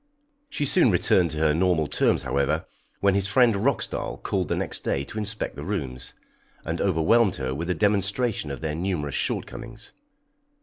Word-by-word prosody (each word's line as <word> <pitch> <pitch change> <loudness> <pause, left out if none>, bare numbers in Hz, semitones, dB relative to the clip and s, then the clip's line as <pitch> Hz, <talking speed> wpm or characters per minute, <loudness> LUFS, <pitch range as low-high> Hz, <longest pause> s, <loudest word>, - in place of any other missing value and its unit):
She 150 - -2
soon 145 -1 +5
returned 90 -2 +3
to 80 - -6
her 75 -1 +3
normal 85 -1 +2
terms, - - +1
however, 70 +3 0 0.4
when 100 -1 +4
his 100 0 +1
friend 120 +3 +4
Roxdal 115 +8 -1
called 95 -4 -1
the - - 0
next - - -1
day 70 - -1
to 105 - -6
inspect 105 +1 -3
the - - -7
rooms, 65 -2 -5 0.5
and 80 +1 -2
overwhelmed 95 +4 +3
her 65 -2 -3
with 85 +6 -4
a 90 - +1
demonstration 100 0 0
of 70 - -6
their 80 -2 -2
numerous 80 -4 -2
shortcomings. 120 -1 -4
90 Hz, 170 wpm, -25 LUFS, 75-105 Hz, 0.5 s, soon